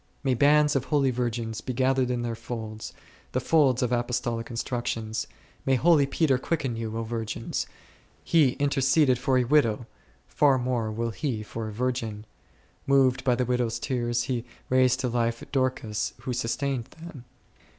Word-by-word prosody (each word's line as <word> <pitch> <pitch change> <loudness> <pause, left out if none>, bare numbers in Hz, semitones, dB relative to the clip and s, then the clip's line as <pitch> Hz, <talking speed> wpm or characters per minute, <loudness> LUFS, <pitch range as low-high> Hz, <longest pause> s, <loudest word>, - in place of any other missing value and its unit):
May 135 -2 +2
bands 150 +3 +4
of 135 -1 0
holy 140 -3 +2
virgins 120 -2 -2
be 130 - -4
gathered 130 0 +2
in 120 -1 -1
their 120 -1 -2
folds, 110 -1 -6 0.4
the 130 - +1
folds 130 -2 +3
of 125 - 0
apostolic 120 -1 -1
instructions! 115 -2 -3 0.4
May 135 - +2
holy 150 +1 +4
Peter 135 -2 +2
quicken 135 -5 -2
you, 115 -1 -4
O 115 - -2
virgins; 115 0 -3 0.6
he 150 -7 +4
interceded 135 -2 +2
for 130 0 +2
a 125 - +3
widow, 120 -4 +2 0.4
far 140 -3 +3
more 120 -3 -1
will 115 +2 -2
he 115 -4 -3
for 110 +1 -5
a - - -5
virgin; 115 -2 -3 0.6
moved 135 -2 +3
by 125 -2 +3
the 125 - 0
widows' 120 -2 0
tears 120 -1 -1
he 120 -2 -2 0.3
raised 130 0 +3
to 130 - 0
life 115 -1 -1
Dorcas 130 -5 -1
who 130 - -3
sustained 125 +1 -1
them. 155 -2 -12
125 Hz, 160 wpm, -27 LUFS, 115-135 Hz, 0.6 s, bands